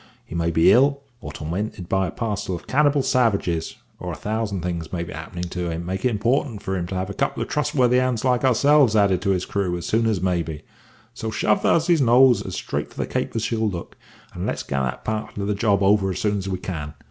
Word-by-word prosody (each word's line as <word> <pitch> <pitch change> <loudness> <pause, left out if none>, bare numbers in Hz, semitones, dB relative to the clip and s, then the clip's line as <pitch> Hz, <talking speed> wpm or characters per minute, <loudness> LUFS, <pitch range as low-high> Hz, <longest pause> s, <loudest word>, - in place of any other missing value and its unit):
He - - -11
may 85 -1 0
be 80 0 +5
ill, 140 +3 +4 0.2
or - - -7
tormented 90 +3 -4
by 95 0 +1
a - - -5
parcel 105 -5 -3
of 85 - -9
cannibal 145 0 +2
savages, 105 -11 +1 0.2
or - - -5
a - - -5
thousand 105 -3 -3
things 85 -2 -4
may 85 -2 -2
be 85 - -8
happening 80 +4 -6
to 90 -1 -3
him 80 0 -3
to - - -8
make 95 +2 -4
it 125 - +3
important 120 0 0
for 95 - -2
him 85 -2 -2
to 95 - -5
have 95 +1 -2
a - - -5
couple - - -1
of - - -9
trustworthy 125 -4 +2
hands 125 -2 0
like 125 -1 +2
ourselves 135 -1 +4
added 100 -4 +3
to 100 - -1
his 95 -2 +1
crew 95 -3 -1
as 85 - -6
soon 115 +1 +1
as 110 -4 +1
may 90 -1 +1
be. 80 -2 -7 0.5
So 115 -2 -4
shove 105 -1 +1
the - - +3
huzzey's 165 -1 +3
nose 125 0 +5
as - - -6
straight - - -3
for - - -19
the - - -1
Cape - - -3
as 115 - -1
she'll 110 -1 0
look, 85 -3 -7 0.4
and - - -4
let's - - -2
get 70 - -2
that 65 -1 -3
part 110 -1 -3
of 100 - -2
the 105 - 0
job 100 -1 +1
over 100 0 +3
as 95 - -3
soon 105 -1 0
as 95 0 -4
we 95 - -2
can. 80 -5 -6
100 Hz, 255 wpm, -23 LUFS, 90-120 Hz, 0.5 s, be